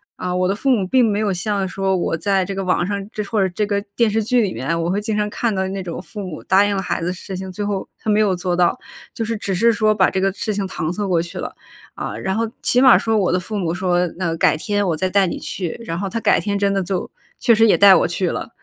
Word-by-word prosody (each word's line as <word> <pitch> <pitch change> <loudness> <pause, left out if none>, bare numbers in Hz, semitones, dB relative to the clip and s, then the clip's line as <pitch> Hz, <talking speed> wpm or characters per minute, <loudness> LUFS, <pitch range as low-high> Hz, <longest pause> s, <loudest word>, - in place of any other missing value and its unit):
啊， 180 0 -3
我 180 0 +1
的 195 - 0
父 270 - -1
母 220 -8 +3
并 255 +3 +4
没 205 - 0
有 210 -3 0
像 195 +1 -1
说 190 0 -1
我 170 - -1
在 190 +2 0
这 195 - -4
个 195 0 -3
网 180 -1 +1
上 200 +1 -4
这 210 - -3
或 210 0 -1
者 190 -2 +1
这 210 - +1
个 200 -1 -1
电 230 -2 +3
视 220 0 +1
剧 245 +2 +2
里 200 - -1
面， 145 +8 -2
我 175 - -1
会 205 +2 -1
经 215 0 -2
常 210 0 0
看 230 -3 -1
到 190 0 -1
那 195 0 -4
种 175 -2 -6
父 190 +4 -10
母 180 -5 -7
答 195 +2 +4
应 205 - 0
了 190 - -1
孩 175 - -2
子 175 +2 -1
事 185 +1 -7
情， 190 0 -6
最 205 +3 -4
后 200 -2 -3
他 220 - -5
没 210 - +3
有 205 -4 +2
做 180 0 -2
到， 175 +6 +2 0.4
就 225 - -2
是 230 +1 -2
只 195 -2 -3
是 230 +5 +4
说 215 0 +2
把 190 - +4
这 190 - -1
个 195 0 +2
事 215 +1 -3
情 195 -1 -2
搪 160 -3 -3
塞 205 +1 -3
过 175 -3 +2
去 170 +1 -5
了。 - - -6 0.4
啊， 110 - -5
然 190 - -2
后 225 0 -1
起 250 - +3
码 260 -2 +8
说 225 -1 0
我 190 -4 +1
的 180 - +2
父 210 +4 -5
母 170 -3 -1
说： 180 -1 +1
“那 170 -3 -1
改 155 - +3
天 205 +2 -1
我 165 - +1
再 185 +3 0
带 195 -1 +3
你 - - -3
去，” 180 +2 -5
然 165 +2 -3
后 195 -1 -3
他 230 - -3
改 - - +3
天 200 -1 -2
真 200 0 +1
的 195 - +1
就 185 0 -3 0.3
确 235 - +4
实 225 0 +5
也 - - +4
带 200 -1 +8
我 - - +4
去 175 0 -1
了。 - - -5
195 Hz, 320 characters per minute, -20 LUFS, 180-210 Hz, 0.4 s, 码